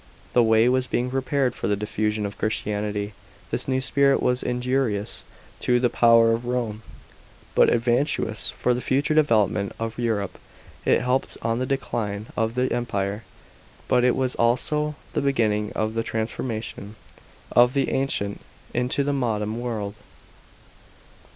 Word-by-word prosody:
The 120 - +5
way 110 0 +4
was 130 0 +2
being 125 0 -1
prepared 135 -1 0
for - - -3
the 105 - +2
diffusion 105 +1 -1
of 100 0 -6
Christianity. 105 -1 -2 0.4
This - - -2
new 130 -1 +1
spirit 140 +1 +3
was 125 0 +1
injurious 125 -4 -1 0.4
to 125 0 +2
the 125 -1 +2
power 115 -1 +5
of 115 +1 -2
Rome, 120 -4 -2 0.7
but - - +5
advantageous 120 -1 +1
for 125 - 0
the 125 - -2
future 140 +4 +1
development 110 - +2
of 115 +1 -4
Europe. 110 -5 -1 0.5
It - - +4
helped 125 +1 0
on 115 +1 0
the 130 - -1
decline 110 -6 -2
of 115 0 0
the 125 +1 +1
Empire, 105 -3 -2 0.6
but 125 -1 +3
it 125 - +4
was 130 -1 0
also 150 +6 +1 0.2
the - - 0
beginning 110 -6 +1
of 110 0 -1
the 115 - 0
transformation 110 -1 -4 0.6
of 120 +2 +5
the 135 -1 +1
ancient 115 -7 -1 0.3
into 125 +3 0
the 145 +1 0
modem 110 -4 -1
world. 110 -4 -4
120 Hz, 145 wpm, -24 LUFS, 110-125 Hz, 0.7 s, The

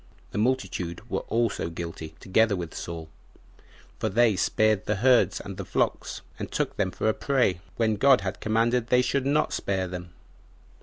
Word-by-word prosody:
The - - -2
multitude 95 -8 -1
were - - +1
also 115 -7 0
guilty, 80 -1 -7
together 105 +2 +2
with 85 -3 -5
Saul; 85 -2 -6 0.9
for 110 - 0
they 115 +1 +4
spared 110 +2 +2
the 105 - +1
herds 115 -3 +4
and 100 -2 -8
the - - -4
flocks, - - -1 0.2
and - - -5
took - - -1
them 95 - 0
for 95 - -2
a 110 - +4
prey, 125 -12 +1 0.2
when 110 -2 +1
God 135 0 +5
had 95 -1 -4
commanded 115 +2 +1
they 125 0 +4
should 130 +2 0
not 150 +2 +2
spare 95 -2 -1
them. 90 -1 -7
105 Hz, 170 wpm, -26 LUFS, 90-120 Hz, 0.9 s, God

